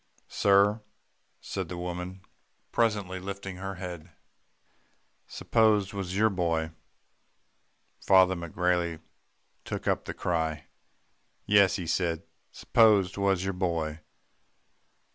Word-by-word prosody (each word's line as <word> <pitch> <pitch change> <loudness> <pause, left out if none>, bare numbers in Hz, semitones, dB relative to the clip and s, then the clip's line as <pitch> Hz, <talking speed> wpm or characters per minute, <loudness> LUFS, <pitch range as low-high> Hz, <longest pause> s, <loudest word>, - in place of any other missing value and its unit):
"'Sir,' 100 +2 +3 0.6
said 95 -4 -5
the 90 - -5
woman 90 +1 -5 0.5
presently 105 -5 0
lifting 95 0 -6
her 95 +1 -5
head. 90 -2 -7 1.2
'S'pose 110 -4 +2
'twas 95 -2 -4
your 110 +1 +3
boy.' 85 -3 -1 1.3
"Father 95 -1 +5
McGrailey 85 -1 -1 0.6
took - - -5
up - - 0
the - - -6
cry. 80 -3 -2 0.8
'Yes,' 100 -2 +5
he 90 -4 -4
said, 85 0 -1 0.3
's'pose 105 -5 +4
'twas 100 -2 0
your 95 0 -2
boy. 85 -4 -2
95 Hz, 100 wpm, -28 LUFS, 85-100 Hz, 1.3 s, Father